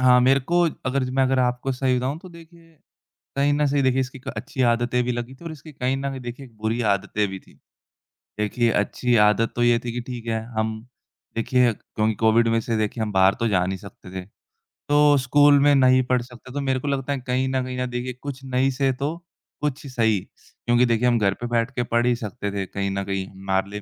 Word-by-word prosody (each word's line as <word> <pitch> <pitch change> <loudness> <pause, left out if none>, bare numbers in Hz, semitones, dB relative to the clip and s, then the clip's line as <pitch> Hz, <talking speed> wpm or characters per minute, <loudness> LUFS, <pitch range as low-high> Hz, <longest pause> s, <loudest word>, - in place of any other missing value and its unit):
हाँ, 125 -1 +6
मेरे 135 +2 +4
को 175 +7 +1 0.3
अगर 130 +1 0
मैं 135 +1 +2
अगर 130 0 +2
आपको 125 +1 0
सही 130 0 +1
बताऊँ 130 +5 -2
तो 185 - -10
देखिए 165 -1 -16 0.6
कहीं 140 +1 +3
ना 150 0 +2
से 140 0 +1
देखिए 130 0 +2
इसकी 130 +1 -4
क - - -4
अच्छी 130 0 -3
आदतें 120 +1 +2
भी 125 - 0
लगी 120 +2 -5
थीं 170 - -16
और 160 - -5
इसकी 155 +1 -12
कहीं 130 -1 -1
न 140 +1 -3
कहीं 135 -1 -6
देखिए 125 +2 -7
एक 115 -3 -21
बुरी 115 +2 0
आदतें 100 0 +1
भी 95 0 -6
थीं, - - -21 0.8
देखिए 115 +3 +1
अच्छी 120 +4 0
आदत 105 +2 +3
तो 120 - +1
ये 120 -1 +4
थी 120 -1 -5
कि 120 - -3
ठीक 120 -2 -7
है, 110 -1 -1 0.2
हम 110 0 0 0.6
देखिए 125 +1 +3
क्यों 110 0 -2
कोविड 115 +1 +4
में 115 - +2
से 115 0 -2
देखिए 110 +1 -1
हम 105 - -2
बाहर 95 0 +4
तो 115 - +2
जा 90 -3 +2
नहीं 95 0 -3
सकते 95 -1 -13
थे, 95 -1 -6 0.7
तो 145 0 +5
स्कूल 145 +2 +5
में 145 +1 +5
नहीं 130 -1 +5
पढ़ 125 0 +1
सकते, 125 +1 -12
तो 145 - -2
मेरे 135 -1 0
को 145 - -6
लगता 140 0 -1
है 140 - -3
कहीं 130 +1 +1
न 130 -1 0
कहीं 125 0 -5
ना 125 - -1
देखिए 125 0 -4
कुछ 140 -2 -6
नहीं 130 +1 +1
से 135 0 +1
तो 140 +5 -3 0.5
कुछ 145 -1 -2
सही, 115 -5 +1 0.5
क्योंकि 120 +1 +4
देखिए 120 0 +2
हम 120 -1 +3
घर 100 -2 +2
पे 120 - -2
बैठ 120 +1 0
के 120 - 0
पढ़ 120 0 +1
ही 125 - +3
सकते 110 -3 -5
थे 100 -1 -3
कहीं 100 +1 -3
न 100 0 -2
कहीं, 95 -1 -3
हमारे 95 0 -2
लिए 105 0 -6
125 Hz, 235 wpm, -23 LUFS, 110-135 Hz, 0.8 s, हाँ